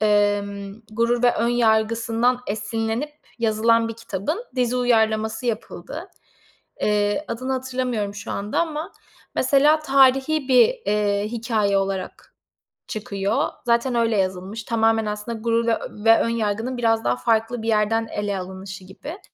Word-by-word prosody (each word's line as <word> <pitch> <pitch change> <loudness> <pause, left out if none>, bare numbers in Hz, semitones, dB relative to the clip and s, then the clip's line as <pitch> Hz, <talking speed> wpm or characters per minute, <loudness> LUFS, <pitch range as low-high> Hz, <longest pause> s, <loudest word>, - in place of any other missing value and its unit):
emm, 205 -1 +1
Gurur 235 +2 +1
ve 245 -1 +4
Önyargı'sından 230 +1 +2
esinlenip 225 +6 -2 0.3
yazılan 230 0 +2
bir 225 - -5
kitabın 230 - -4
dizi 250 0 +1
uyarlaması 220 -1 +1
yapıldı. 230 -2 -5 0.7
Eee, 210 +7 +1
adını 255 +3 -3
hatırlamıyorum 250 -5 -2
şu 205 0 -7
anda 205 +8 -1
ama, 315 -2 -3 0.4
mesela, 295 +2 +4
tarihî 270 +1 +3
bir, 250 -2 +7 0.2
eee, 205 0 +1
hikâye 220 -3 0
olarak 195 -1 -4 0.6
çıkıyor 200 -1 -1 0.2
zaten 235 +2 +2
öyle 230 -2 +2
yazılmış. 190 +3 -2
Tamamen 225 -1 +2
aslında 210 +2 -4
Gurur 230 +1 +1
ve 225 - +4
ö 210 - -9
ve 225 0 +7
Önyargı'nın 230 +2 -1
biraz 225 -1 +2
daha - - +1
farklı 225 0 0
bir 225 - -4
yerden 225 +1 +2
ele 205 -1 -2
alınışı 190 +1 -8
gibi 285 - -9
225 Hz, 130 wpm, -23 LUFS, 210-240 Hz, 0.7 s, bir